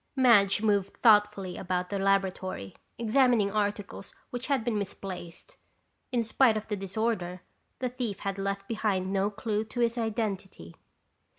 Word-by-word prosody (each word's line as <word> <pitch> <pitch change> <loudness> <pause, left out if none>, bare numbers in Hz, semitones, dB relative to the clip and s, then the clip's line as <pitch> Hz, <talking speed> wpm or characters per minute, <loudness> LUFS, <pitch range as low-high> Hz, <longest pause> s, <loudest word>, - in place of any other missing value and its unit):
Madge 215 -6 +5
moved 200 -3 +1
thoughtfully 205 -5 +4
about 180 0 -2
the 200 - -1
laboratory 190 - 0 0.2
examining 235 -3 +3
articles 205 -1 -3 0.2
which 245 0 -4
had 275 -5 +1
been 225 -3 0
misplaced. 185 -3 -7 0.5
In 240 -2 +1
spite 225 0 +3
of 215 - -5
the 210 - 0
disorder, 195 -2 -2 0.4
the 255 -1 -2
thief 245 -5 -3
had 195 0 -3
left 195 0 -3
behind 200 -4 -1
no 195 +1 +2
clue 215 0 -2
to 240 - -7
his 235 0 +1
identity. 205 - -3
205 Hz, 140 wpm, -29 LUFS, 195-230 Hz, 0.5 s, Madge